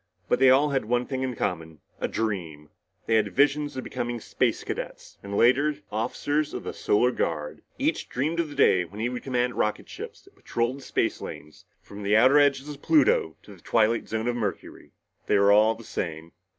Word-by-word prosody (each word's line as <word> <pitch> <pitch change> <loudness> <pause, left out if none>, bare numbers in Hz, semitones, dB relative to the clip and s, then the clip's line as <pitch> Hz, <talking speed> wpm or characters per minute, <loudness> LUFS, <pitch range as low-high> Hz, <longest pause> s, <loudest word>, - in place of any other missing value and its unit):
But - - +1
they 135 0 +6
all 140 +3 +5
had 135 -5 0
one 120 +2 0
thing 130 -2 -4
in 130 -2 -2
common 80 -6 -3 0.2
a - - -1
dream. 85 -9 -4 0.4
All 115 - +1
had 105 -2 +1
visions 145 +1 +2
of 130 - -3
becoming 120 0 -4
Space - - -1
Cadets, - - -7
and 100 0 -5
later, 140 +5 +4 0.2
officers 145 +7 -1
in - - -5
the - - -5
Solar 125 +4 +2
Guard. 75 -9 -3 0.2
Each - - -1
dreamed 155 +6 -1
of 165 -2 0
the 145 - -10
day 95 -9 +4
when 95 +5 -11
he 115 +2 0
would 125 -1 -5
command 125 -2 -1
rocket 105 - -1
ships - - -9
that - - -22
patrolled 120 +3 -2
the - - -12
space - - -1
lanes 75 +1 -9 0.2
from 100 +1 -10
the 105 +1 +3
outer 130 +6 +6
edges 140 -1 +2
of 145 -1 -8
Pluto 450 +10 +3
to - - -13
the - - -17
twilight 115 0 +1
zone 110 +1 -2
of 120 - 0
Mercury. 115 -4 -5 0.4
They - - +3
were 100 0 +5
all 110 +2 +5
the 115 - -12
same. 80 -5 -5
120 Hz, 205 wpm, -26 LUFS, 105-135 Hz, 0.4 s, they